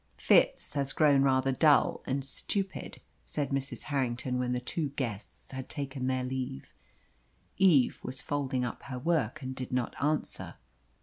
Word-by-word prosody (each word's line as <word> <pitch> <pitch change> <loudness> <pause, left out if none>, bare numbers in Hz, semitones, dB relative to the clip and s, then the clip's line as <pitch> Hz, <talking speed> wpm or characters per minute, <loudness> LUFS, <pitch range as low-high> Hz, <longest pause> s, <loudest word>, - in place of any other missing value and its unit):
"Fitz - - +3
has 140 -2 -1
grown 145 -3 +5
rather 135 -1 +3
dull 145 +2 +4
and 135 +1 -1
stupid," 195 +7 -3 0.2
said 145 -3 -3
Mrs. 135 -1 -2
Harrington, 125 -3 -1
when 125 0 0
the 125 - 0
two 145 +4 -2
guests 105 -9 -5
had 130 -1 -6
taken 135 -3 -3
their 130 -1 0
leave. 125 - -4 0.8
Eve 170 -10 +5
was 130 +1 -5
folding 135 -3 -1
up 120 - -5
her 135 -2 -5
work, 145 -3 0
and 130 0 -4
did 130 -1 -5
not 125 -2 -1
answer. 150 +1 -1
130 Hz, 150 wpm, -30 LUFS, 125-145 Hz, 0.8 s, grown